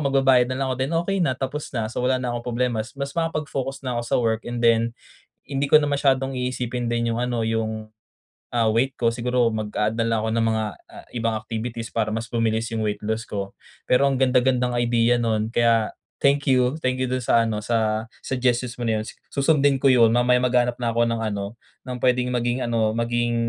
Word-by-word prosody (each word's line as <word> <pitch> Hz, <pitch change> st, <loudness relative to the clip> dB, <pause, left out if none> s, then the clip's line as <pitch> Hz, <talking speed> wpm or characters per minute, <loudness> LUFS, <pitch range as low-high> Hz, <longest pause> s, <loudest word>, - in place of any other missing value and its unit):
magbabayad 135 Hz, -2 st, +4 dB
na 130 Hz, -, -2 dB
lang 135 Hz, -, 0 dB
ako, -, -, -4 dB
then 135 Hz, +5 st, -1 dB
okey 195 Hz, +2 st, -1 dB
na, 130 Hz, -6 st, +1 dB
tapos 140 Hz, +3 st, -4 dB
na. 110 Hz, -2 st, 0 dB
So, -, -, -3 dB
wala 130 Hz, +1 st, +2 dB
na 125 Hz, -1 st, -2 dB
akong 120 Hz, 0 st, -5 dB
problema, 120 Hz, -1 st, 0 dB
mas 110 Hz, -, -11 dB
mas 140 Hz, 0 st, -3 dB
makapag-focus 145 Hz, -5 st, -3 dB
na 125 Hz, -1 st, -2 dB
ako -, -, -5 dB
sa -, -, +2 dB
work 115 Hz, -2 st, 0 dB
and 120 Hz, 0 st, -4 dB
then, 115 Hz, 0 st, +4 dB, 0.6 s
hindi 140 Hz, 0 st, -1 dB
ko 150 Hz, +2 st, +6 dB
na 145 Hz, -, 0 dB
masyadong 135 Hz, -2 st, +1 dB
iisipin 125 Hz, -1 st, -2 dB
din 115 Hz, 0 st, 0 dB
yung -, -, -2 dB
ano, 120 Hz, -1 st, -1 dB
yung, 110 Hz, -1 st, -2 dB, 0.7 s
ah, 115 Hz, -2 st, +3 dB
weight 120 Hz, +5 st, +1 dB
ko. 115 Hz, -, +3 dB
Siguro 120 Hz, +1 st, +1 dB
mag-a-add 110 Hz, 0 st, -2 dB
na 115 Hz, -, +1 dB
lang 115 Hz, -1 st, +1 dB
ako 110 Hz, -, -1 dB
ng 115 Hz, -, +2 dB
mga, 110 Hz, -1 st, +1 dB, 0.3 s
ah, -, -, -12 dB
ibang 115 Hz, -1 st, 0 dB
activities 115 Hz, +1 st, -5 dB
para 110 Hz, -2 st, -1 dB
mas 115 Hz, 0 st, -4 dB
bumilis 115 Hz, -1 st, 0 dB
yung 110 Hz, -, -1 dB
weight 105 Hz, -, -2 dB
loss 110 Hz, +2 st, -2 dB
ko. 100 Hz, -1 st, -5 dB, 0.3 s
Pero 125 Hz, +2 st, +4 dB
ang 135 Hz, -1 st, 0 dB
ganda-gandang 125 Hz, -1 st, +2 dB
idea 120 Hz, 0 st, +3 dB
no'n 110 Hz, -2 st, 0 dB
kaya, 115 Hz, -2 st, +3 dB, 0.3 s
thank 140 Hz, 0 st, +3 dB
you, 130 Hz, 0 st, +3 dB
thank 130 Hz, 0 st, 0 dB
you 130 Hz, -, 0 dB
do'n 130 Hz, -1 st, -2 dB
sa 115 Hz, -, +4 dB
ano, 105 Hz, -1 st, -3 dB
sa 110 Hz, -1 st, 0 dB, 0.2 s
suggestions 125 Hz, -1 st, -1 dB
mo 120 Hz, -, -4 dB
na 110 Hz, -2 st, +1 dB
'yun. -, -, -5 dB
Su 140 Hz, -, -7 dB
susundin 140 Hz, -2 st, +3 dB
ko 140 Hz, -, +4 dB
'yun, 115 Hz, -3 st, +5 dB
mamaya 125 Hz, +1 st, +4 dB
maghahanap 125 Hz, -1 st, +2 dB
na 120 Hz, -2 st, -1 dB
ako 115 Hz, 0 st, +2 dB
ng 115 Hz, -1 st, -1 dB
ano, 100 Hz, +1 st, -4 dB, 0.3 s
ng 125 Hz, -, -4 dB
puwedeng 125 Hz, 0 st, +1 dB
maging 120 Hz, +1 st, 0 dB
ano, 115 Hz, -2 st, +1 dB
maging, 120 Hz, +1 st, 0 dB
120 Hz, 215 wpm, -23 LUFS, 115-130 Hz, 0.7 s, ko